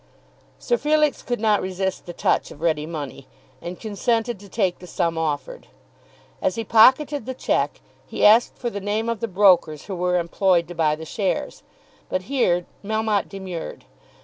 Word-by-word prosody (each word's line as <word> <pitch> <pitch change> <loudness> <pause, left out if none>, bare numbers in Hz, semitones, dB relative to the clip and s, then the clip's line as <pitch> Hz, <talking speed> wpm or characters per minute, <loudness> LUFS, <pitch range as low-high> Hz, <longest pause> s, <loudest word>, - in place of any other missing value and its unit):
Sir 485 - 0
Felix 300 -1 +2
could 245 -3 -3
not 215 -2 +2
resist 190 0 -3
the - - -5
touch - - 0
of - - -12
ready 155 -2 0
money, 145 -4 -7 0.3
and 175 +1 -7
consented 225 +1 -1
to 200 0 -14
take 190 -4 0
the 180 - -11
sum 170 -1 -1
offered. 150 -4 -3 0.7
As 185 - 0
he 225 - -3
pocketed 260 +5 +4
the 260 - -4
cheque - - -1 0.3
he - - 0
asked 220 +3 +5
for 240 -2 -3
the 200 - -5
name 215 +3 -1
of 230 -2 -2
the 230 - -2
brokers 180 -6 +3
who 200 - -6
were 180 0 +1
employed 175 0 +1
to - - -6
buy 160 -3 +1
the 160 +1 -9
shares. 195 +4 -2 0.5
But 185 - -1
here 180 -7 +1 0.2
Melmotte 215 -1 0
demurred. 190 -4 -7
190 Hz, 175 wpm, -23 LUFS, 170-225 Hz, 0.7 s, asked